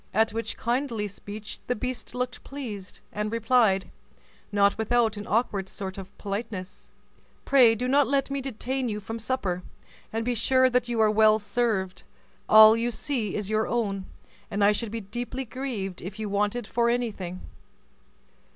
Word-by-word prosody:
At 220 +1 +4
which 230 +1 -3
kindly 235 -3 -1
speech 205 +2 -8
the 250 - +1
beast 255 +2 -5
looked 250 -1 -3
pleased, 220 -9 -7
and 210 0 -2
replied, 225 -4 +2 0.6
not 200 -1 +4
without 225 0 +2
an 205 0 -7
awkward 205 -4 0
sort 190 -1 -6
of 190 0 -11
politeness, 200 -2 -5 0.6
"Pray 245 -5 +6
do 250 +3 -2
not 280 +2 +4
let 275 0 +1
me 275 0 -1
detain 260 0 -2
you 210 -1 -3
from 225 +3 -6
supper, 205 -7 -2 0.5
and 225 +1 -2
be 245 - +1
sure 260 +2 +3
that 245 -1 +1
you 235 -1 -1
are 215 -1 +5
well 215 0 +5
served. 205 -4 -1 0.5
All 215 0 +9
you 230 +1 0
see 235 -3 -2
is 210 0 -3
your 215 0 +1
own, 200 -5 -1 0.4
and 200 0 0
I 205 - +6
should 215 +2 -2
be 230 0 -4
deeply 240 +5 -5
grieved 225 -6 -4
if 190 +3 -7
you 215 -1 -3
wanted 210 +3 0
for 235 +2 +1
anything." 205 -7 -2
220 Hz, 165 wpm, -27 LUFS, 205-245 Hz, 0.6 s, All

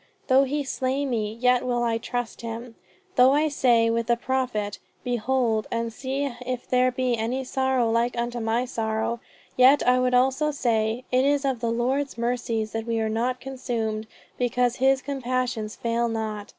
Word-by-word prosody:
though 265 +1 +6
he 290 +2 -1
slay 265 +1 -1
me 220 -5 -1
yet 250 +1 +3
will 245 -1 0
I 230 -1 0
trust 245 0 -4
in 230 - -4
him!... 230 +1 -7 0.4
Though 255 +2 +7
I 305 +2 +2
say 240 -5 +3
with 230 0 -1
the 235 -1 +3
Prophet, 240 -6 -2 0.2
Behold 240 -2 0
and 230 -1 -2
see 270 +3 -2 0.2
if 250 -1 -4
there 255 0 +3
be 250 -1 0
any 235 +4 -2
sorrow 260 -2 +1
like 235 +2 +1
unto 240 0 -2
my 230 +2 0
sorrow, 220 -1 -2 0.4
yet 260 +3 +5
I 250 0 +5
would 250 0 +2
also 265 +4 +3
say, 230 -4 0
It 255 +1 +3
is 285 0 +2
of 265 -3 0
the 230 0 -1
Lord's 255 +4 -1
mercies 235 -2 -1
that 225 0 -4
we 230 -1 0
are 220 0 0
not 240 +3 -1
consumed 230 -5 -3 0.3
because 245 0 +1
his 265 +1 +3
compassions 255 -5 -2
fail 235 0 0
not. 215 -2 -4
245 Hz, 175 wpm, -25 LUFS, 230-260 Hz, 0.4 s, Though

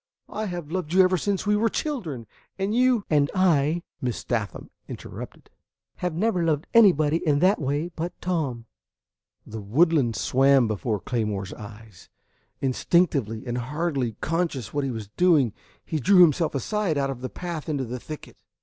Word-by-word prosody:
I 215 0 -3
have 175 -4 -6
loved 175 -3 -3
you 190 0 +7
ever 185 0 +3
since 195 +3 -1
we 210 0 +3
were 225 +2 +2
children, 185 - -3 0.3
and 195 +2 -1
you 250 -2 +3
" - - -42
"And 145 -1 +3
I," 170 -3 +2 0.2
Miss 125 -2 -3
Sathman 110 -4 -3 0.2
interrupted, - - -9 0.5
"have 180 -3 -2
never 190 -1 +1
loved 155 -2 0
anybody 165 -9 +5
in 150 -4 +1
that 185 +4 +3
way 145 +5 -1
but 170 +2 -5
Tom." 145 -10 -2 0.8
The 110 0 -7
woodland 135 - +2
swam 135 +3 +3
before 110 0 -2
Claymore's 105 -3 -3
eyes. 105 -2 -12 0.5
Instinctively, 135 - +1
and 120 0 -2
hardly 135 -2 -2
conscious 165 - -2
what 145 -1 0
he 135 - -1
was 110 -5 -6
doing, 150 - +3 0.3
he 160 - -2
drew 185 +6 +5
himself 160 -1 +2
aside 175 - -1
out 135 -1 0
of 125 -2 -8
the 130 - -4
path 170 -4 -6
into 140 -4 -1
the 125 +2 -5
thicket. 155 +4 -9
150 Hz, 165 wpm, -25 LUFS, 125-180 Hz, 0.8 s, you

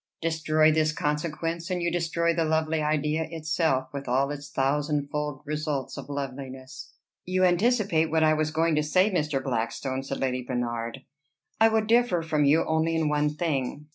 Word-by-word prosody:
Destroy 155 -1 +2
this 155 0 +2
consequence, 165 +3 -2
and 180 -1 -1
you 170 0 0
destroy 170 0 0
the 165 0 +1
lovely 160 0 0
idea 150 +1 0
itself, 155 -4 0
with 140 -1 -6
all 135 +3 +1
its 145 0 -7
thousand 145 +1 0
fold 150 -1 -3
results 150 -3 -3
of 140 -1 -8
loveliness." 135 -2 -7 0.3
"You 185 +1 0
anticipate 185 -3 +2
what 160 0 +2
I 155 0 +5
was 155 0 0
going 160 +1 +1
to - - +3
say, 185 +7 +3
Mr. 150 -6 -1
Blackstone," 130 +1 -2
said 135 0 -5
Lady 130 -1 -1
Bernard. 120 0 -3 0.6
"I 225 - +7
would 220 -1 +1
differ 230 -6 +3
from 155 -2 +1
you 155 +4 +4
only 160 +1 +1
in 160 -2 +1
one 150 0 +1
thing. 150 -2 -3
155 Hz, 170 wpm, -26 LUFS, 140-165 Hz, 0.6 s, I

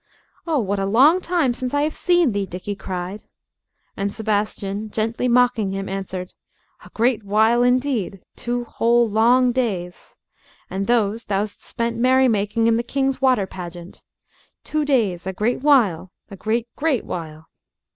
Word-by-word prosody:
"Oh, 320 -2 +1
what 200 -5 -1
a 195 - -1
long 280 - +5
time 340 -9 +1
since 255 +2 -4
I 285 - +2
have 305 +1 -1
seen 350 -6 +2
thee!" 200 -1 -2
Dickie 185 +3 -5
cried. 185 +1 -5 0.7
And 200 0 -2
Sebastian, 210 -1 -2
gently 225 +3 -1
mocking 240 -5 +2
him, 195 0 -4
answered, 190 -1 -5 0.5
"A - - -14
great 230 -1 0
while 220 +4 +3
indeed 245 -6 +1 0.2
two 240 0 -3
whole 235 0 +2
long 240 +4 +4
days. 195 -9 -3 0.6
And 195 +1 -2
those 230 -1 +1
thou'st 200 +1 -3
spent 230 -1 -3
merrymaking 230 -4 +2
in 230 0 +3
the - - +1
King's 270 +2 -1
water 255 -7 +3
pageant. 175 -1 -9 0.6
Two 305 -1 -1
days 210 -11 0
a 190 - -2
great 220 +7 -1
while, 220 - +3 0.2
a - - -7
great, 225 +4 -1
great 290 -5 0
while." 160 -2 -7
225 Hz, 150 wpm, -21 LUFS, 195-250 Hz, 0.7 s, long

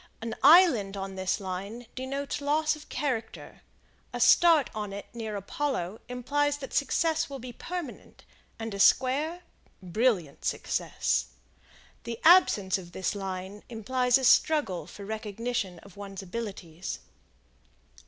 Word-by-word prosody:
An 225 0 -4
island 260 - +6
on 195 0 -5
this 190 +2 -1
line 200 +5 -6
denotes 275 +3 -4
loss 305 +2 +1
of 305 - -14
character, 250 -5 -4 0.5
a 245 - -5
start 310 +3 +5
on 210 -2 -4
it 200 +1 -6
near 220 -3 -5
Apollo 205 -2 -3
implies 290 +4 0
that 270 -2 -8
success 320 +3 +1
will 275 - -6
be 250 -1 -8
permanent, 345 -2 -7 0.3
and 225 -1 -5
a 200 - -5
square, 295 - +3 0.4
brilliant 185 - 0
success. - - -1 0.8
The 230 -1 -5
absence 205 - +5
of 175 -2 -12
this 190 - -1
line 195 0 -5
implies 250 +2 +2
a 265 - -5
struggle 270 - +3
for 200 - -10
recognition 215 -2 -3
of 200 -1 -16
one's 195 -1 -7
abilities. 190 -4 -6
230 Hz, 130 wpm, -28 LUFS, 195-280 Hz, 0.8 s, island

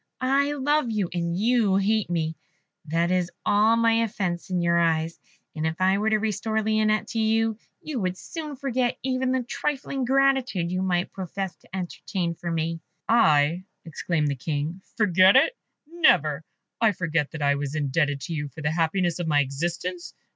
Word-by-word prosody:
I 275 +2 +2
love 290 -1 +1
you, 210 -5 -1
and 170 -1 -1
you 220 -2 +2
hate 205 +1 +1
me 160 -2 -1 0.5
that 165 +3 0
is 180 -1 +1 0.2
all 215 +2 +4
my 230 0 +3
offence 190 -5 -2
in 180 -1 0
your 170 0 +2
eyes. 165 -1 0 0.4
And 155 0 -1
if 160 +2 -4
I 190 +1 +3
were 215 +1 +1
to 215 - +3
restore 220 +1 -1
Lionette 215 0 +1
to 225 - -2
you, 220 0 +1 0.2
you 300 -5 -4
would 185 -2 -2
soon 305 - -7
forget 255 -2 -1
even 260 0 0
the 260 -1 0
trifling 275 +1 -3
gratitude 265 -9 +2
you 185 0 -1
might 180 -1 -1
profess 190 0 -5
to - - -13
entertain 180 -1 -3
for 170 +1 -6
me." 165 0 -2 0.3
"I," 165 -5 +3 0.2
exclaimed 160 -1 -1
the 140 - -1
King, 150 +6 -3 0.2
"forget 190 -2 +5
it? 315 - +4 0.3
Never! 160 - +3 0.4
I 220 -2 +4
forget 165 -4 -1
that 160 -2 -5
I 140 0 +4
was 140 +1 -3
indebted 145 -1 0
to 165 - -5
you 145 -2 -3
for 150 +3 -10
the 150 - +1
happiness 170 +2 0
of 175 - -2
my 150 -2 +3
existence? 170 +6 -4
185 Hz, 175 wpm, -25 LUFS, 165-225 Hz, 0.5 s, forget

